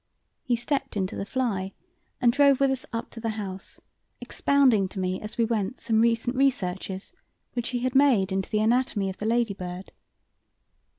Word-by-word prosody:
He 245 - 0
stepped 245 -1 -2
into 190 -1 -2
the 195 - -4
fly 205 -8 -2 0.5
and 240 -2 +4
drove 280 0 +5
up - - -13
with 275 -1 +3
us 265 -1 -3 0.2
to 230 - -9
the 225 0 -2
house, 195 -2 -7 0.4
expounding 260 -9 +3
to 195 - -7
me 185 0 -2
as 215 +3 -7
we 230 - +3
went 225 +1 -2
some 220 -2 +2
recent 230 +2 +1
researches 195 - -1 0.4
which 240 -1 -2
he 245 -2 -2
had 255 0 -1
made 260 -9 +4
into 190 0 -1
the 215 - +1
anatomy 220 -4 +1
of 190 - -11
the 210 - -2
lady 230 -2 +1
bird. 180 0 -7
225 Hz, 180 wpm, -26 LUFS, 195-255 Hz, 0.5 s, drove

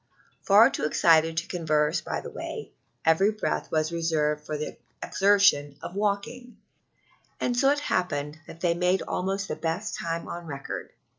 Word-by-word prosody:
Far 215 +6 +6
too - - -2
excited 160 +1 +4
to 160 - -1
converse 155 -4 +1
by - - -4
the - - -8
way, - - -7 0.3
every 160 +5 +4
breath 215 0 -2
was 155 0 0
reserved 155 -3 0
for 150 0 -4
the 150 - -5 0.3
exertion 190 -7 +3
of - - -6
walking, 210 +5 -2 0.8
and 245 - 0
so 270 +3 +4
it 290 +1 +1
happened 150 - -1
that 165 - -12
they 175 -2 +2
made 180 +2 +1
almost 195 +2 -2
the - - -3
best 170 +7 -3
time 165 0 -3
on 175 -1 -7
record. 140 -3 -6
170 Hz, 160 wpm, -26 LUFS, 155-200 Hz, 0.8 s, Far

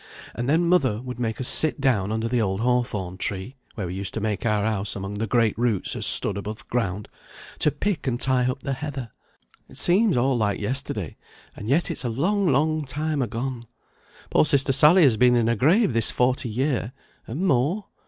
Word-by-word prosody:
And 120 +2 -3
then 165 +4 +3
mother 135 -12 +2
would 125 0 -7
make 110 -2 -2
us 130 - 0
sit 155 -1 +1
down 115 -8 +1
under 110 +1 -1
the 120 0 0
old 95 -1 -1
hawthorn 115 -7 -1
tree 100 +7 -4 0.2
(where 100 - -4
we 90 - -5
used 95 0 -5
to - - -1
make 105 0 -2
our 105 -2 +1
house 105 -2 -1
among 100 +1 -5
the 115 - -1
great 115 -1 +2
roots 115 -6 +1
as - - 0
stood 100 -1 +2
above 105 +2 -6
th' - - -36
ground), 105 -4 -2 0.5
to - - +4
pick 165 -2 -3
and 120 -2 -1
tie 130 -1 +2
up 130 +1 -5
the 140 - -2
heather. 135 -4 -6 0.6
It - - -11
seems 190 - +3
all 130 +2 +2
like 105 -4 0
yesterday, 105 - -3 0.4
and 105 - -7
yet 155 +6 +2
it's - - -3
a 120 - -1
long 185 - 0
long 155 +3 +1
time 150 +2 -2
agone. 120 +1 -4 0.6
Poor - - +4
sister 140 -3 +2
Sally 150 +7 +6
has 125 -7 +4
been 125 +1 +4
in 120 -2 +2
her 115 +1 +1
grave 160 - +3
this 115 -1 +3
forty 125 0 0
year 130 0 -1 0.3
and 145 +12 -3
more. 170 - +1
125 Hz, 205 wpm, -24 LUFS, 110-140 Hz, 0.6 s, Sally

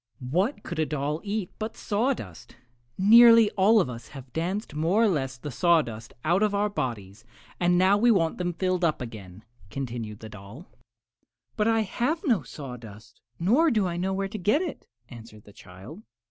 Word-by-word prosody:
"What 205 - 0
could 170 - -6
a 155 - +2
doll 150 +2 -3
eat 205 -3 -3
but 220 +1 -5
sawdust? 210 - -3 0.4
Nearly 230 +2 +7
all 210 +3 +4
of 190 - +1
us 115 -2 -8
have 130 -2 -12
danced 180 +3 -3
more 165 +9 +1
or - - +4
less 135 -8 -2
sawdust 125 -6 0
out 175 +5 +2
of 210 -1 +1
our 205 +1 +1
bodies, 110 - -5 0.4
and 175 0 +2
now 190 +3 +4
we 240 +3 +4
want 170 -8 +2
them 175 -1 -2
filled 185 +1 -1
up 160 -3 +1
again," 110 -5 -9 0.3
continued 115 -3 -6
the 110 - -8
doll. 105 - -12 0.9
"But 210 - +1
I 225 -1 +3
have 245 - -1
no 230 - +2
sawdust, 120 -6 -11 0.2
nor 250 - +3
do 215 -7 +1
I 175 -2 -2
know 185 +2 -2
where 195 0 -2
to 210 +2 -7
get 215 - +2
it," 335 - -7 0.2
answered 115 -3 -13
the 105 - -17
child. 95 - -12
175 Hz, 175 wpm, -26 LUFS, -, 0.9 s, Nearly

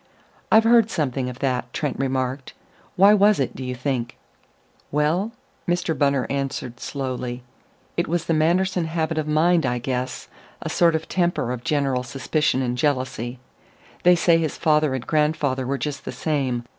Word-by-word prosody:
"I've 220 0 +7
heard 230 -1 +5
something 135 - -1
of 125 - -8
that," 125 -1 -1
Trent 145 -4 -2
remarked. 130 0 -2 0.4
"Why 200 +3 +7
was 205 -2 +4
it, 135 - -1
do 130 - -6
you 125 0 -4
think?" 125 -2 -3 0.7
"Well," 160 +9 +1 0.4
Mr. 175 -2 0
Bunner 140 -3 +2
answered 135 -3 -3
slowly, 125 -3 -4 0.5
"it - - 0
was 170 0 -1
the 165 - +1
Manderson 175 +3 +2
habit 160 0 -1
of 155 - -3
mind, 165 +3 +3
I 125 -2 0
guess; 125 +1 -3 0.3
a - - -5
sort 170 -2 +3
of 160 - -3
temper 175 -9 0
of 125 -1 -5
general 140 -4 0
suspicion 135 +1 0
and 125 0 -2
jealousy. 130 -4 -1 0.6
They 180 0 +6
say 170 -1 +4
his 160 -2 -2
father 150 -3 +2
and 125 - -5
grandfather 150 -4 0
were 140 +1 -1
just 145 0 -4
the - - -5
same.... 135 -6 -1
145 Hz, 165 wpm, -23 LUFS, 130-165 Hz, 0.7 s, I've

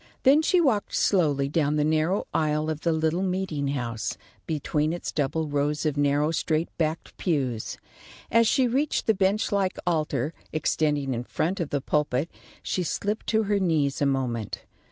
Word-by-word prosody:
Then 280 +3 +6
she 355 +3 +3
walked 260 -11 +1
slowly 145 -8 +2
down 150 0 +1
the 150 - +2
narrow 155 +5 +1
aisle 155 0 +1
of 155 -1 -5
the 170 - +1
little 160 +2 +1
meeting 185 -6 -1
house, 115 -5 -3 0.3
between 155 0 0
its 175 - -4
double 155 +2 -1
rows 145 +1 -1
of 150 -2 +1
narrow 145 +2 +2
straight 160 0 -1
backed 160 0 -2
pews. 130 - -1 0.5
As 230 0 +5
she 260 +2 +3
reached 275 +5 0
the 220 - +4
bench 200 +3 +1
like 195 -2 0
altar, 155 -4 0 0.2
extending 145 -3 0
in 120 0 -3
front 175 +9 -2
of 165 -4 -2
the 145 - -1
pulpit, 150 +1 0 0.3
she 185 - -1
slipped 205 +5 -2
to 220 0 +2
her 205 -1 +1
knees 155 -7 +1
a 140 - +3
moment. 125 -5 -2
155 Hz, 170 wpm, -26 LUFS, 145-185 Hz, 0.5 s, Then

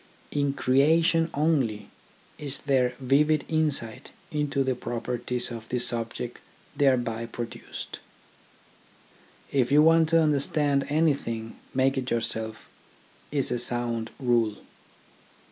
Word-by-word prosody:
In 145 -1 0
crea 140 +5 +4
tion 165 0 +2
only 140 -9 0 0.5
is 140 -2 -4
there 130 -3 +2
vivid 145 +4 +2
insight 150 -8 -1 0.2
into 145 -2 0
the 130 0 0
properties 120 +1 -3
of 115 -1 -8
the 125 - -1 0.2
object 115 +1 -5 0.4
thereby 120 -5 +1
produced. 115 0 -7 1.5
If 130 -2 +1
you 150 +1 +6
want 165 0 +5
to 165 0 +5
understand 145 -1 +1
anything, 140 -8 0 0.2
make 135 +1 +2
it 130 -1 -4
yourself, 110 -1 -2 0.6
is 140 -4 0
a 125 - 0
sound 120 -2 0
rule. 120 -5 +2
130 Hz, 110 wpm, -27 LUFS, 120-145 Hz, 1.5 s, you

